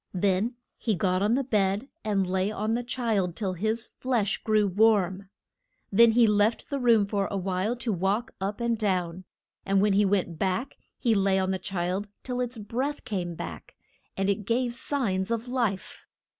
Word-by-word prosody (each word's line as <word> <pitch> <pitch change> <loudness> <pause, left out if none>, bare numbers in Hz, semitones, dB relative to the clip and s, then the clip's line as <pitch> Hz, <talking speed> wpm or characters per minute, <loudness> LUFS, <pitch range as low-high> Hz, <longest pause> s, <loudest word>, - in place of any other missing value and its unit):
Then 200 +5 +1 0.2
he 220 -4 0
got 185 -1 +1
on 210 +4 +3
the 275 - +1
bed, 205 -1 0 0.2
and 200 -3 +1
lay 190 +2 0
on 215 +1 -1
the 240 +1 -1
child 220 -8 -1
till 195 -4 -2
his 220 +5 -1
flesh 235 -6 0
grew 215 -1 +3
warm. 200 -1 +2 0.6
Then 230 +3 +6
he 235 0 +6
left 210 +4 +1
the 280 - -1
room 230 -5 +4
for 200 -1 -1
a 200 - -3
while 190 +4 -1
to 235 -2 -2
walk 195 +6 0
up 200 +3 -2
and 235 -1 +1
down, 185 -4 -1 0.4
and 195 0 +2
when 205 0 +3
he 205 +1 +4
went 185 -4 0
back 195 +8 -1 0.2
he 235 - +2
lay 195 -2 +2
on 190 0 +1
the 190 - -1
child 190 +2 -2
till 250 -1 -3
its 245 -1 -3
breath 250 +7 -3
came 175 -5 -3
back, 85 - -8 0.4
and 195 0 0
it 200 0 0
gave 240 +1 +1
signs 220 -8 -1
of 230 +1 -2
life. 235 -7 -2
205 Hz, 185 wpm, -27 LUFS, 190-230 Hz, 0.6 s, Then